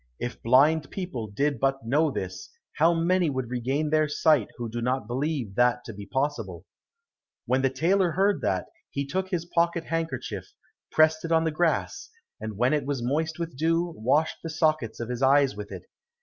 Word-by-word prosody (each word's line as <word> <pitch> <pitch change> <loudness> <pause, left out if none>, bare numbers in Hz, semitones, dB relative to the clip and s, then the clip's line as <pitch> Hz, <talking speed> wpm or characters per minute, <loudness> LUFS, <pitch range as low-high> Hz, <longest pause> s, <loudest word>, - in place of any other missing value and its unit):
If 120 - -5
blind 145 +6 +4
people 175 - -5
did 140 +6 -1
but 135 -1 0
know 150 +7 +2
this, 95 -8 -5 0.3
how 165 +2 +4
many 170 +1 +2
would 130 -3 -3
regain 135 +5 -1
their 155 -1 +3
sight 155 +1 +3
who 120 -1 -4
do 120 +1 -4
not 125 0 0
believe 130 -2 -2
that 125 +3 +2
to 115 - -7
be 100 0 -9
possible." 115 - -2 0.8
When 130 +1 +1
the 135 - +3
tailor 170 +6 +2
heard 195 +1 +2
that, 95 -1 0 0.2
he 140 - -3
took 185 +7 -2
his 175 -3 -2
pocket 170 -1 +1
handkerchief, 165 0 -4 0.4
pressed 155 0 +4
it 165 - -4
on 165 0 +4
the 160 - 0
grass, 165 +1 -1 0.3
and 110 -2 -6
when 125 +5 +2
it 145 -3 0
was 140 -4 -2
moist 155 +5 -1
with 170 -4 -5
dew, 165 +4 +1
washed 140 +8 +1
the 165 - -5
sockets 155 -6 0
of 115 - -4
his 125 0 -4
eyes 135 -3 +4
with 105 0 -7
it. 95 -2 -7
145 Hz, 190 wpm, -26 LUFS, 120-160 Hz, 0.8 s, blind